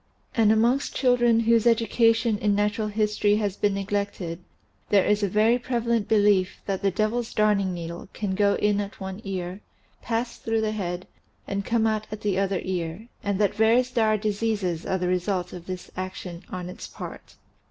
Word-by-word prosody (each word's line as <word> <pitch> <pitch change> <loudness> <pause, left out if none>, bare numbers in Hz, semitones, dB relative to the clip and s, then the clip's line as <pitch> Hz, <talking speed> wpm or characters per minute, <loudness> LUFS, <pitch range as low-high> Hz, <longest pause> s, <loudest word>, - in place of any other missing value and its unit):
And 220 -2 +4
amongst 235 +5 +2
children 240 -3 +3
whose 230 0 +3
edu 230 -1 +3
cation 230 -2 +3
in 205 -2 +2
natural 210 +1 0
history 210 -1 +1
has 205 -3 -1
been 205 -1 +1
neglected 195 -4 -3 0.5
there 200 -2 +4
is 210 0 +2
a 200 - +1
very 220 +5 +3
prevalent 235 -3 0
belief 205 -3 +3
that 195 -2 -2
the 200 - +3
devil's 220 +4 -1
darning 205 -3 +2
needle 170 +1 -6
can 205 -3 -3
go 200 +1 +3
in 205 0 +1
at 200 0 -7
one 190 +1 -6
ear, 185 0 -4 0.4
pass 235 +1 -2
through 225 0 0
the 215 -1 0
head 185 -4 -3 0.4
and 200 0 -2
come 230 -1 +1
out 215 -1 0
at 215 0 -6
the 200 -2 0
other 195 -1 0
ear, 180 +4 -4
and 200 -1 0
that 205 -2 +2
various 235 +3 +3
dire 220 -3 +2
diseases 205 -5 -1
are 190 - +1
the 180 -1 -1
result 180 0 -1
of 175 -1 -9
this 185 -1 -6
action 185 -2 -6
on 180 -1 -5
its 180 - -8
part. - - -9
205 Hz, 185 wpm, -25 LUFS, 190-225 Hz, 0.5 s, And